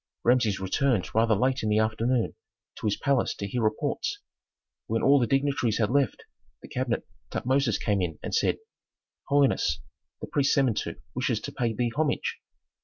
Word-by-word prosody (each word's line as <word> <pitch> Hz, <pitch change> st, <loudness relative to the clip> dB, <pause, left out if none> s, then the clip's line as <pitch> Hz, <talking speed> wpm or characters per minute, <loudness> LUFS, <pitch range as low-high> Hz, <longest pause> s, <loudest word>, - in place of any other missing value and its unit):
Rameses 115 Hz, -5 st, +3 dB
returned 100 Hz, +3 st, 0 dB
rather 110 Hz, 0 st, +3 dB
late 130 Hz, +5 st, +1 dB
in 110 Hz, -, -1 dB
the 105 Hz, -, +3 dB
afternoon 110 Hz, +2 st, +1 dB, 0.5 s
to -, -, -2 dB
his 105 Hz, -, +1 dB
palace 140 Hz, -3 st, +1 dB
to 100 Hz, -, -5 dB
hear 120 Hz, +4 st, -2 dB
reports. 110 Hz, -1 st, -1 dB, 0.7 s
When 115 Hz, +1 st, 0 dB
all 140 Hz, +1 st, +6 dB
the 120 Hz, -, +1 dB
dignitaries 135 Hz, -4 st, +1 dB
had 110 Hz, 0 st, +1 dB
left 140 Hz, -5 st, +1 dB, 0.4 s
the -, -, -9 dB
cabinet 125 Hz, -2 st, -2 dB, 0.2 s
Tutmosis 130 Hz, -3 st, +1 dB
came 100 Hz, -3 st, 0 dB
in 80 Hz, -4 st, -2 dB
and -, -, -4 dB
said, -, -, +2 dB, 0.7 s
"Holiness, 140 Hz, -2 st, +2 dB, 0.4 s
the -, -, -5 dB
priest 140 Hz, -1 st, +1 dB
Samentu 130 Hz, -5 st, +1 dB, 0.2 s
wishes -, -, 0 dB
to -, -, -6 dB
pay 120 Hz, -2 st, -1 dB
thee 120 Hz, +1 st, 0 dB
homage." 150 Hz, 0 st, 0 dB
120 Hz, 165 wpm, -27 LUFS, 110-135 Hz, 0.7 s, all